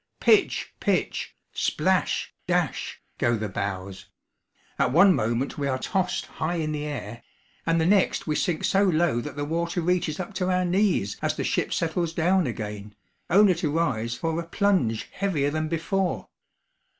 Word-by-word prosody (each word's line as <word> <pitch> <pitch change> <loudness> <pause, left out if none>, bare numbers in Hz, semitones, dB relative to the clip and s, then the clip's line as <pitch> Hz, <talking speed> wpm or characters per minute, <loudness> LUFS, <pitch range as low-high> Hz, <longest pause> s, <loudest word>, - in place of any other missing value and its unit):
Pitch, - - +3
pitch - - -1 0.2
splash, - - 0
dash, - - -1 0.2
go 120 0 +2
the 110 0 -3
bows; 95 -1 -4 0.7
at - - +2
one 185 +6 +7
moment 120 +3 -1
we 140 - 0
are 130 -1 0
tossed 185 +6 -1
high 165 +2 -3
in 155 -2 -1
the 150 -1 -3
air, 120 -6 -6 0.5
and 165 0 +3
the 160 - +2
next 195 +2 +3
we 155 - -1
sink 165 -1 0
so 195 - +3
low 170 -9 +2
that 150 - -7
the 145 0 -2
water 170 +4 -1
reaches 175 -2 0
up 185 +3 -5
to 185 -1 -1
our 185 0 +2
knees 180 - +1
as - - 0
the - - -2
ship - - 0
settles 165 0 -1
down 175 0 +2
again, 105 -3 -6 0.3
only 195 +2 +6
to 165 -2 -2
rise 115 -8 0
for 165 +4 -2
a 170 - -5
plunge 175 - +1
heavier 160 -8 0
than 155 +1 -1
before. 175 +3 -1
160 Hz, 165 wpm, -26 LUFS, 125-180 Hz, 0.7 s, one